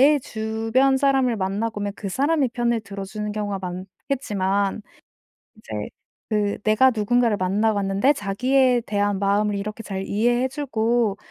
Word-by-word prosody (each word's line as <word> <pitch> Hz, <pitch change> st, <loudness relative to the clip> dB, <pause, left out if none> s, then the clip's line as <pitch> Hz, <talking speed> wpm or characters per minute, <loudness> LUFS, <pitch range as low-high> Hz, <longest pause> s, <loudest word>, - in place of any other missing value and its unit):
내 -, -, 0 dB
주변 225 Hz, +4 st, 0 dB
사람을 265 Hz, -3 st, +2 dB
만나보면 205 Hz, +1 st, -2 dB
그 200 Hz, -, -5 dB
사람의 280 Hz, -, +1 dB
편을 235 Hz, -2 st, 0 dB
들어주는 200 Hz, +1 st, -6 dB
경우가 205 Hz, -2 st, -3 dB
많겠지만 195 Hz, +2 st, -2 dB, 0.7 s
이제 -, -, -11 dB, 0.6 s
그 210 Hz, -2 st, 0 dB
"내가 220 Hz, +5 st, +4 dB
누군가를 230 Hz, 0 st, +1 dB
만나 205 Hz, +4 st, +1 dB
봤는데 200 Hz, +6 st, +2 dB
자기에 250 Hz, +4 st, +2 dB
대한 205 Hz, -1 st, 0 dB
마음을 205 Hz, +1 st, +1 dB
이렇게 210 Hz, +3 st, -5 dB
잘 195 Hz, -2 st, -4 dB
이해해 240 Hz, +4 st, +1 dB
주고 235 Hz, -6 st, 0 dB
215 Hz, 310 characters per minute, -23 LUFS, 200-245 Hz, 0.7 s, 내가